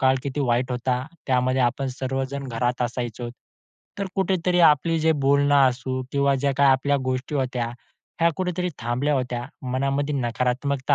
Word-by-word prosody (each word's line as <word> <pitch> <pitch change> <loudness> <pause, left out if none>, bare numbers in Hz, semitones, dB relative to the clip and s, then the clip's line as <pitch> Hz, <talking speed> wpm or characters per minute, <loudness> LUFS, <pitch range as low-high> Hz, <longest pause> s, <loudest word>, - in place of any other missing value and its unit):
काळ 130 -1 +4
किती 140 +1 -3
वाईट 125 +1 +1
होता. 125 +1 -1 0.2
त्यामध्ये 130 0 +2
आपण 130 +3 0
सर्वजण 135 +1 -3
घरात 125 +1 -1
असायचो. 120 -1 -3 0.7
तर 200 - -1
कुठेतरी 185 -2 +1
आपली 165 0 +4
जे 160 +1 +4
बोलणं 140 +1 +3
असू 130 +1 -3
किंवा 140 0 +3
ज्या 140 0 +1
काही 140 -1 +5
आपल्या 140 +2 +2
गोष्टी 130 +3 -2
होत्या, 130 -3 -1 0.5
ह्या 170 0 +5
कुठेतरी 180 -1 -1
थांबल्या 125 +5 0
होत्या. 125 -2 -2 0.3
मनामध्ये 140 +2 0
नकारात्मकता 130 +3 0
130 Hz, 150 wpm, -24 LUFS, 125-145 Hz, 0.7 s, काही